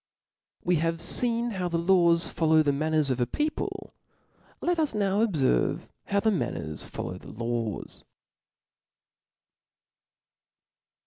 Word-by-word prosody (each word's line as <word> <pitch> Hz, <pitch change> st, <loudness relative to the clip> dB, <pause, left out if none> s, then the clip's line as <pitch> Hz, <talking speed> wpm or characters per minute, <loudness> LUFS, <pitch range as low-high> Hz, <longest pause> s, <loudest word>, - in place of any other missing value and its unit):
We 180 Hz, -1 st, +2 dB
have 165 Hz, +1 st, 0 dB
feen 235 Hz, +7 st, +1 dB
how 185 Hz, -4 st, -2 dB
the 170 Hz, -1 st, -1 dB
laws 170 Hz, -1 st, +4 dB
follow 160 Hz, -1 st, +3 dB
the 145 Hz, -1 st, +2 dB
manners 155 Hz, -1 st, +1 dB
of 130 Hz, -, -1 dB
a 120 Hz, -, +1 dB
people: 300 Hz, -, -3 dB, 0.7 s
let 350 Hz, -1 st, 0 dB
us 300 Hz, -8 st, 0 dB
now 200 Hz, +1 st, +2 dB
obierve 145 Hz, -, +1 dB, 0.2 s
how 200 Hz, -, +1 dB
the 220 Hz, -, +3 dB
man» 195 Hz, -, -1 dB
ners -, -, -6 dB
follow 90 Hz, -, -6 dB
the -, -, -12 dB
laws. 115 Hz, -1 st, -2 dB
170 Hz, 125 wpm, -27 LUFS, 145-205 Hz, 0.7 s, laws